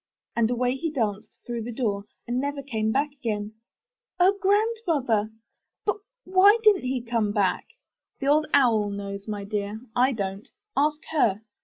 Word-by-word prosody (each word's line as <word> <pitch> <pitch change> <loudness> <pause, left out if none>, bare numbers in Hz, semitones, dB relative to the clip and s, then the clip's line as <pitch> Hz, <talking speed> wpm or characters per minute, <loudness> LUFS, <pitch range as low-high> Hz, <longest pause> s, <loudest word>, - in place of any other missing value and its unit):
And 230 -1 +2
away 250 +1 0
he 325 +4 -2
danced 215 -8 -3
through 240 -1 -3
the 235 +2 -5
door 210 -5 -2 0.2
and 245 +1 0
never 285 0 -3
came 220 -5 -1
back 285 +4 +1
again." 215 -6 -4 0.7
0 370 +2 +6
Grandmother! 380 - +1 0.6
But 415 - +1 0.3
why 380 +4 +6
didn't 415 -9 +5
he 255 -1 -1
come 230 -3 0
back?" 205 -3 0 0.5
'The 275 - -4
Old 300 +2 +3
Owl 230 -7 +4
knows, 200 0 -6
my 205 -2 -4
dear, 205 +1 -3 0.2
I 255 +2 +4
don't. 195 -2 -4 0.3
Ask 300 +2 +1
her." 220 -9 +2
240 Hz, 155 wpm, -26 LUFS, 210-295 Hz, 0.7 s, 0